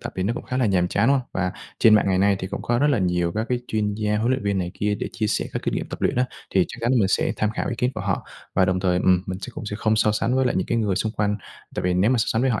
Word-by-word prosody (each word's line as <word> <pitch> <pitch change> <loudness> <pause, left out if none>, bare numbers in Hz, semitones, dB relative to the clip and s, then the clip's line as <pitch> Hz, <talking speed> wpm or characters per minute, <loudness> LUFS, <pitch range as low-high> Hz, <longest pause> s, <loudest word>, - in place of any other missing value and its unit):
tập - - -6
thì 95 - -1
nó 105 +5 0
cũng - - -5
khá 125 - -3
là 130 -2 +2
nhàm 90 -3 +2
chán, 100 +5 +1
đúng - - +5
hông? 130 -2 -3
Và 90 -1 -1 0.3
trên 110 - +6
mạng 105 - +4
ngày 95 - +2
nay 100 0 +3
thì 95 - -4
cũng - - -5
có 120 0 +1
rất 145 - +3
là 135 - +2
nhiều 90 -2 0
các 110 +2 -1
cái 125 -1 0
chuyên 105 -1 0
gia 105 0 0
huấn 115 +3 +1
luyện 130 - 0
viên 100 -1 0
này 90 -1 -2
kia 105 0 0
để - - -4
chia 110 -2 -1
sẻ 105 - 0
các - - -3
kinh - - -1
nghiệm - - -2
tập - - -7
luyện - - +1
á, 125 - +3 0.3
thì 95 -2 +3
chắc - - -9
chắn 120 +2 +1
là 130 - +3
mình 95 -3 +3
sẽ - - +1
tham 105 - +1
khảo - - -3
ý 120 - -1
kiến 125 - +1
của - - -4
họ. - - -2 0.3
Và 95 - +4
đồng 95 0 0
thời, 90 -1 +2
ừm, 90 0 +3
mình 95 0 -4
sẽ 125 - -6
cũng 110 - -6
sẽ 105 - -4
không 110 0 +1
so 105 -1 +3
sánh 115 +4 0
với 130 - +2
lại - - +1
những 95 - 0
cái 115 - 0
người 105 -4 0
xung 110 +3 -1
quanh. 105 -1 0 0.4
Tại - - -2
vì 90 0 +1
nếu 95 +6 +3
mà 130 - +2
so 110 - +2
sánh 115 - +1
với 135 - +3
họ 110 - 0
105 Hz, 365 wpm, -23 LUFS, 95-115 Hz, 0.4 s, trên